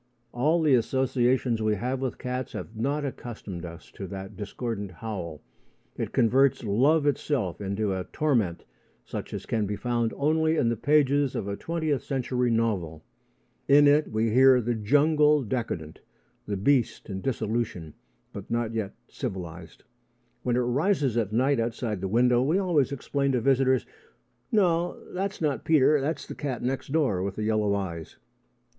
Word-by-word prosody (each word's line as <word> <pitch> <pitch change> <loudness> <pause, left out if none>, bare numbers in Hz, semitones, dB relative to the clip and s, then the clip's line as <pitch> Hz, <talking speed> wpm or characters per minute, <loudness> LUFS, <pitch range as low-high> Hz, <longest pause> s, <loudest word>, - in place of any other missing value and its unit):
All 155 +7 +2
the 150 -3 +4
associations 125 -1 +1
we 110 -1 +1
have 125 +6 -2
with 130 -2 -2
cats 125 -1 -4
have 110 - -7
not 140 +6 -1
accustomed 105 -9 -6
us 85 0 -11
to 95 - -7
that 95 0 -7
discordant 105 0 -4
howl. 90 -6 -6 0.5
It - - -4
converts 130 +3 +3
love 135 +9 +3
itself 135 - -1
into 100 +1 -1
a 95 -1 -3
torment 120 - 0 0.4
such - - -6
as - - -5
can 110 -3 -1
be 105 - -2
found 120 0 -1
only 160 +2 +2
in 115 - +2
the 115 - 0
pages 145 +1 +2
of 100 - -3
a 100 - -2
twentieth 155 -2 -2
century 125 -1 -1
novel. 100 -9 -1 0.6
In 145 +1 +7
it 150 +2 +3
we 110 +1 +1
hear 130 +2 +6
the 120 0 -1
jungle 150 +6 +3
decadent 100 -10 -4 0.5
the 100 - -2
beast 125 +5 +1
in 95 -3 -5
dissolution, 110 - -2 0.4
but - - -8
not 115 -1 -1
yet 110 -3 -3
civilised. 85 -2 -7 0.6
When 125 -1 0
it 125 - +2
rises 135 - +1
at 110 -4 0
night 130 +4 +2
outside 115 -3 -2
the 95 - -1
window, 120 +4 +3
we 150 +8 +2
always 170 -8 +2
explain 140 0 -1
to 125 - +2
visitors: 130 +1 +2 0.7
"No; 175 -5 +2
that's 195 +1 -3
not 145 -7 0
Peter. 150 -2 +4
That's 155 +4 -2
the - - -7
cat 135 -5 -4
next 130 +2 -2
door 140 - +1
with 100 0 -3
the 110 - -3
yellow 105 -2 +1
eyes." 85 -5 -5
120 Hz, 160 wpm, -27 LUFS, 105-140 Hz, 0.7 s, In